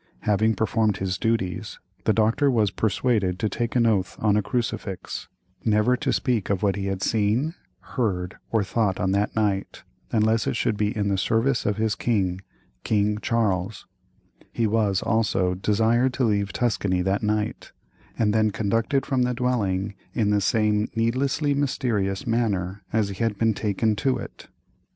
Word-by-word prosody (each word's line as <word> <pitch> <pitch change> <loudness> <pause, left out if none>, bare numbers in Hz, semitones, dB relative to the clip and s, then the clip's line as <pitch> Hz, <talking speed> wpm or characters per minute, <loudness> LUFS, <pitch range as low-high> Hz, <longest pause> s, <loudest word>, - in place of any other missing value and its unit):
Having 110 +1 +2
performed 110 0 +1
his 95 -1 -2
duties, 110 -6 -2 0.3
the - - +4
doctor 115 +6 +2
was 110 -6 +2
persuaded 105 -3 0
to 110 - 0
take 120 +3 -3
an 120 -2 +4
oath 105 -5 +1
on 105 -2 +2
a 105 - +3
crucifix, 105 -6 -3 0.4
"never 110 +3 +3
to 125 - -1
speak 120 -6 0
of 100 -1 0
what 100 -2 +2
he 100 -1 -3
had 95 0 -2
seen, 115 +8 +1 0.3
heard, 95 -8 -2
or 110 -3 +2
thought 100 -1 0
on 95 +1 +1
that 100 +2 0
night, 100 -3 -1 0.3
unless 110 0 +2
it - - 0
should 115 -1 0
be 105 0 0
in 100 -1 0
the 95 -1 +1
service 115 +7 +1
of 105 - 0
his 110 -1 +1
king 95 -5 0 0.4
King 105 -1 +1
Charles;" 105 -5 -1 0.7
he 115 - 0
was, 105 -3 +1
also, 105 -5 +1
desired 115 +6 +2
to 135 - 0
leave 100 -3 +1
Tuscany 95 -5 0
that 95 +2 0
night, 105 0 -2 0.5
and 105 -2 +2
then 110 0 +3
conducted 115 +7 0
from 130 -2 0
the 125 0 +1
dwelling 105 -6 0 0.2
in 105 -4 +2
the 105 -1 +2
same 105 +1 +1
needlessly 135 +6 +1
mysterious 115 -8 -1
manner 100 -5 -1
as 110 -2 +1
he 100 +3 -3
had 110 -3 0
been 115 0 +2
taken 105 +1 0
to 130 +4 +1
it. - - -9
105 Hz, 165 wpm, -24 LUFS, 100-115 Hz, 0.7 s, the